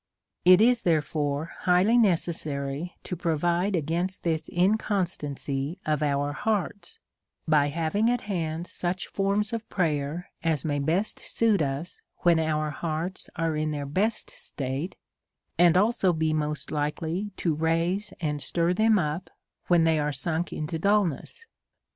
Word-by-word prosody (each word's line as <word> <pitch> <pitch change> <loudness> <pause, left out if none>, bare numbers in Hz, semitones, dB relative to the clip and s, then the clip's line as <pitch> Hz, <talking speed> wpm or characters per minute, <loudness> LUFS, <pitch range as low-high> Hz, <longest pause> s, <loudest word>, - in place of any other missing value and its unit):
It 185 +2 +8
is 240 +1 +4
therefore 150 -2 0
highly 185 +5 +4
necessary 165 - 0
to 180 - -4
provide 175 +3 +1
against 170 +4 -2
this 160 -2 -1
inconstancy 175 -7 -1
of 155 -1 0
our 145 -1 0
hearts, 210 - -2 0.5
by 150 -2 +4
having 170 +9 +1
at 245 -1 +1
hand 170 -4 -3
such 180 0 -2
forms 200 +3 0
of 230 -1 -4
prayer 160 0 -1
as 160 -4 0
may 145 -2 0
best 165 +9 0
suit 220 -5 +1
us 140 +4 -3 0.2
when 170 -2 +4
our 155 -1 0
hearts 165 +5 -4
are 165 -1 0
in 155 0 0
their 145 -2 -3
best 195 +11 -1
state, 135 +6 -4 0.6
and 175 0 +6
also 205 -2 +3
be 160 -1 0
most 150 -2 -2
likely 160 +6 -2
to 165 - +1
raise 165 +6 0
and 150 -3 -2
stir 170 +5 +1
them 220 +3 +4
up 170 +1 -2 0.4
when 175 -2 +5
they 160 -1 +3
are 150 0 0
sunk 160 +5 -2
into 155 +1 -3
dulness. 205 - 0
165 Hz, 140 wpm, -27 LUFS, 150-190 Hz, 0.6 s, It